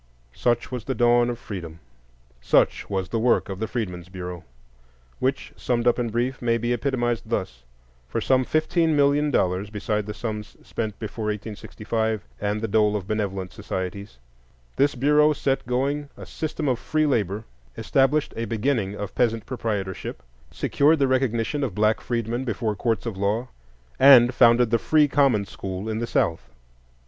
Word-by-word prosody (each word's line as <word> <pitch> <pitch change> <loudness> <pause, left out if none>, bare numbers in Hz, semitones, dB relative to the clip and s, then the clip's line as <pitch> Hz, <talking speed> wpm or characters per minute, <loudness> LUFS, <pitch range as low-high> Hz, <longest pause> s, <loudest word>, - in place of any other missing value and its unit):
Such 120 0 0
was 125 -3 -4
the 130 - -2
dawn 120 +1 +4
of 120 - -3
Freedom; 85 -8 -8 0.6
such - - +2
was 95 -2 -2
the 115 - -1
work 120 -2 +2
of 95 -1 -5
the 110 - -2
Freedmen's 90 -8 -4
Bureau, 90 -2 -7 0.8
which, 135 +1 -1
summed 120 -1 -1
up 120 +1 +3
in 120 -1 -1
brief, 120 +4 -2
may 115 -1 +2
be 120 +1 -1
epitomized 120 -3 -1
thus: 60 0 -3 0.4
for - - -2
some 130 -1 +2
fifteen 160 +3 +1
million 145 +1 +3
dollars, 95 -5 0
beside 105 0 -2
the 105 - -4
sums 105 -2 -5
spent 110 -3 -4
before 110 0 -5
1865, 110 +1 -3
and 105 +1 -1
the 115 - -1
dole 105 0 +2
of 95 -3 -4
benevolent 100 -3 -2
societies, 95 - -5 0.6
this 140 +1 +2
Bureau 150 +4 +4
set 135 -4 -1
going 140 +4 -1
a - - -9
system 155 -1 -4
of 125 -3 +1
free 155 0 0
labor, 105 -7 0 0.3
established 140 +3 +1
a 115 - -2
beginning 115 -3 -1
of 105 -1 -6
peasant 115 -3 0
proprietorship, 105 -7 -4 0.3
secured 150 +3 +2
the 140 -2 +2
recognition 130 +1 0
of 130 - -3
black 110 +1 +2
freedmen 120 +1 -2
before 115 -3 -2
courts 115 +3 -1
of 115 -5 -4
law, 105 +6 -1 0.5
and 130 -2 +8
founded 120 -1 +5
the 115 - +3
free 150 +5 +4
common 135 -8 +3
school 95 +1 -6
in 110 0 -2
the 120 - -2
South. 80 - 0
115 Hz, 165 wpm, -24 LUFS, 105-130 Hz, 0.8 s, and